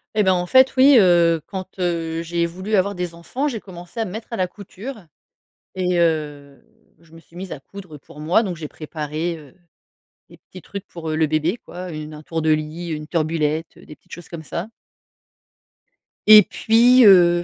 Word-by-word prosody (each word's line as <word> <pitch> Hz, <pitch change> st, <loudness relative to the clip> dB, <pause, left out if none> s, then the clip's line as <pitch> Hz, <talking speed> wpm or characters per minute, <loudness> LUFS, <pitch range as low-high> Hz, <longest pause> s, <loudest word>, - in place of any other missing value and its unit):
Eh 210 Hz, -, +3 dB
ben 190 Hz, -1 st, +3 dB
en 180 Hz, -1 st, -1 dB
fait, 260 Hz, +6 st, +5 dB
oui, 270 Hz, +1 st, +7 dB
heu, 170 Hz, -4 st, +4 dB
quand, 190 Hz, -1 st, -8 dB
heu, 165 Hz, -2 st, -2 dB
j'ai 170 Hz, 0 st, -1 dB
voulu 185 Hz, +5 st, -7 dB
avoir 200 Hz, +1 st, +1 dB
des 180 Hz, -1 st, -4 dB
enfants, 245 Hz, -, -4 dB
j'ai 240 Hz, -6 st, -3 dB
commencé 175 Hz, +1 st, -11 dB
à 225 Hz, -, 0 dB
me 185 Hz, -, -7 dB
mettre 220 Hz, +3 st, -8 dB
à -, -, -3 dB
la 185 Hz, -1 st, 0 dB
couture 205 Hz, +4 st, -10 dB, 0.7 s
et 180 Hz, -1 st, 0 dB
heu, 150 Hz, -4 st, -1 dB, 0.4 s
je 165 Hz, -1 st, -23 dB
me 165 Hz, -, -14 dB
suis 170 Hz, -, -18 dB
mise 185 Hz, 0 st, -6 dB
à 140 Hz, -, -10 dB
coudre 185 Hz, -2 st, -11 dB
pour 145 Hz, +1 st, -16 dB
moi. 170 Hz, +9 st, +2 dB
Donc 185 Hz, -5 st, -4 dB
j'ai 155 Hz, -1 st, -6 dB
préparé, 155 Hz, +2 st, -5 dB
heu, 150 Hz, -1 st, -16 dB, 0.7 s
des -, -, -16 dB
petits 185 Hz, -, -14 dB
trucs 200 Hz, +2 st, -8 dB
pour 165 Hz, -4 st, -8 dB
le 155 Hz, 0 st, +1 dB
bébé, 155 Hz, +6 st, 0 dB
quoi, 180 Hz, 0 st, -8 dB
une 155 Hz, 0 st, -7 dB
un 150 Hz, -, -10 dB
tour 160 Hz, +1 st, -4 dB
de 160 Hz, -, +3 dB
lit, 155 Hz, +3 st, -2 dB
une 150 Hz, -1 st, -5 dB
turbulette, 160 Hz, -1 st, -2 dB
des 150 Hz, -, -13 dB
petites -, -, -33 dB
choses 175 Hz, 0 st, -10 dB
comme 165 Hz, -2 st, -8 dB
ça 170 Hz, +5 st, -5 dB, 1.6 s
et 215 Hz, -1 st, +10 dB
puis, 240 Hz, +6 st, +4 dB
heu, 175 Hz, -3 st, +6 dB
175 Hz, 195 wpm, -21 LUFS, 160-190 Hz, 1.6 s, et